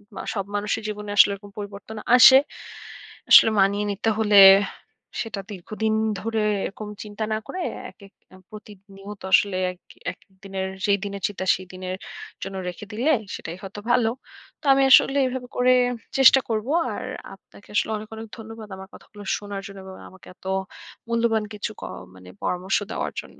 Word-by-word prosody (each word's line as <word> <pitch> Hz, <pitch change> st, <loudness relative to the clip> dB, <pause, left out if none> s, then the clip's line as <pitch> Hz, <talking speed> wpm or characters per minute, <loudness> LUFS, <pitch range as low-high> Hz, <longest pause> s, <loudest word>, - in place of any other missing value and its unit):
উ -, -, -6 dB
সব 195 Hz, -3 st, -3 dB
মানুষের 210 Hz, +2 st, -2 dB
জীবনে 210 Hz, -1 st, -6 dB
আসলে 200 Hz, -, +7 dB
এরকম 200 Hz, 0 st, -14 dB
পরিবর্তন 205 Hz, +2 st, -8 dB, 0.2 s
আসে। 260 Hz, +1 st, +9 dB, 0.9 s
আসলে -, -, +9 dB
মানিয়ে 200 Hz, +2 st, +2 dB
নিতে 200 Hz, +3 st, -1 dB
হলে 210 Hz, -2 st, +5 dB, 0.8 s
সেটা 220 Hz, -3 st, -5 dB
দীর্ঘদিন 215 Hz, +3 st, -3 dB, 0.3 s
ধরে 225 Hz, -1 st, -1 dB, 0.2 s
এরকম 210 Hz, +2 st, -7 dB
চিন্তা 210 Hz, 0 st, -6 dB
না -, -, 0 dB
করে 370 Hz, -, -5 dB, 0.3 s
একেক 200 Hz, -1 st, -18 dB, 0.2 s
উ -, -, -14 dB
প্রতিনিয়ত 200 Hz, -1 st, -12 dB
আসলে 200 Hz, -2 st, +4 dB
এক 180 Hz, -, -16 dB, 0.3 s
একেকদিনের 190 Hz, 0 st, -7 dB, 0.2 s
যেই 200 Hz, -1 st, +3 dB
দিনের 200 Hz, 0 st, -6 dB
চিন্তা, 190 Hz, -2 st, -6 dB
সেই 185 Hz, 0 st, -10 dB
দিনের 185 Hz, 0 st, -5 dB, 0.5 s
জন্য 195 Hz, 0 st, -6 dB
রেখে 180 Hz, +4 st, -9 dB
দিলে, 250 Hz, +9 st, +1 dB, 0.2 s
সেটাই 165 Hz, +2 st, -7 dB
হয়তো 195 Hz, +1 st, -8 dB
ভালো। 240 Hz, -2 st, +3 dB, 0.5 s
তো -, -, -16 dB
আমি 270 Hz, -, +3 dB
আসলে 270 Hz, +1 st, +6 dB
এভাবে 250 Hz, -1 st, -5 dB
করে 250 Hz, 0 st, +4 dB, 0.4 s
চেষ্টা 270 Hz, 0 st, +7 dB
করবো। 225 Hz, +4 st, -2 dB, 0.2 s
আর -, -, -5 dB, 0.3 s
আপনাকে 205 Hz, -, -20 dB
আসলে 220 Hz, -, +1 dB
অনেক, 215 Hz, +1 st, -9 dB
অনেক 225 Hz, 0 st, -8 dB
ধন্যবাদ 225 Hz, -1 st, -10 dB
আমার 190 Hz, 0 st, -10 dB
কথাগুলো 205 Hz, -1 st, -13 dB
শোনার 205 Hz, -1 st, -6 dB
জন্য 200 Hz, 0 st, -11 dB
এবং 190 Hz, 0 st, -10 dB
আমাকে 190 Hz, 0 st, -17 dB
এত -, -, -27 dB, 0.6 s
মূল্যবান 230 Hz, -2 st, +1 dB
কিছু 210 Hz, 0 st, -4 dB
ক -, -, -8 dB, 0.3 s
মানে 90 Hz, -1 st, -14 dB
পরামর্শ 185 Hz, +2 st, 0 dB
দেওয়ার -, -, -3 dB
জন্য। -, -, -18 dB
205 Hz, 160 wpm, -24 LUFS, 195-225 Hz, 0.9 s, আসে